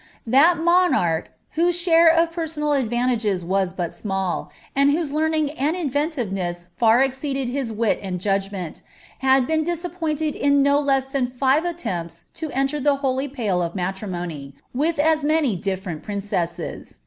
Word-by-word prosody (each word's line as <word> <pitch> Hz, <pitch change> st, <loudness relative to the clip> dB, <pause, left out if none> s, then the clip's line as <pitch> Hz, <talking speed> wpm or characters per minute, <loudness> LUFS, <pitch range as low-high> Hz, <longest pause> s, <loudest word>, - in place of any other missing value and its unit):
That 285 Hz, +9 st, +5 dB
monarch, 330 Hz, -, +2 dB, 0.2 s
whose 345 Hz, +2 st, +1 dB
share 335 Hz, -1 st, +5 dB
of 330 Hz, 0 st, +2 dB
personal 315 Hz, -3 st, -1 dB
advantages 240 Hz, -7 st, 0 dB
was 190 Hz, 0 st, 0 dB
but 175 Hz, -2 st, -4 dB
small, 195 Hz, -3 st, -3 dB, 0.3 s
and 280 Hz, +1 st, +4 dB
whose 295 Hz, -1 st, 0 dB
learning 310 Hz, -1 st, +1 dB
and 305 Hz, +3 st, -1 dB
imaffinativeness 235 Hz, -, -2 dB
far 230 Hz, +2 st, +4 dB
exceeded 270 Hz, -1 st, -2 dB
his 255 Hz, -2 st, -2 dB
wit 220 Hz, 0 st, 0 dB
and 185 Hz, -3 st, -4 dB
judg 195 Hz, +1 st, 0 dB
ncnt, 185 Hz, -5 st, -6 dB, 0.4 s
had 265 Hz, -1 st, +4 dB
been 315 Hz, +2 st, +1 dB
disappointed 320 Hz, -3 st, -2 dB
in 280 Hz, 0 st, +3 dB
no 280 Hz, +1 st, +4 dB
less 270 Hz, -2 st, +1 dB
than 265 Hz, -2 st, -2 dB
&ye 285 Hz, +6 st, +3 dB
attempts 180 Hz, -, -5 dB
to 320 Hz, -1 st, -5 dB
enter 275 Hz, +2 st, -1 dB
the 285 Hz, 0 st, +3 dB
holy 265 Hz, +1 st, 0 dB
pale 220 Hz, -10 st, -1 dB
of 170 Hz, +1 st, -3 dB
matrimony, 175 Hz, -7 st, -4 dB, 0.2 s
with 305 Hz, +6 st, 0 dB
as 310 Hz, +1 st, +2 dB
many 300 Hz, -7 st, +2 dB
different 185 Hz, -3 st, -4 dB
princesses. 180 Hz, -4 st, -4 dB
270 Hz, 150 wpm, -22 LUFS, 195-310 Hz, 0.4 s, That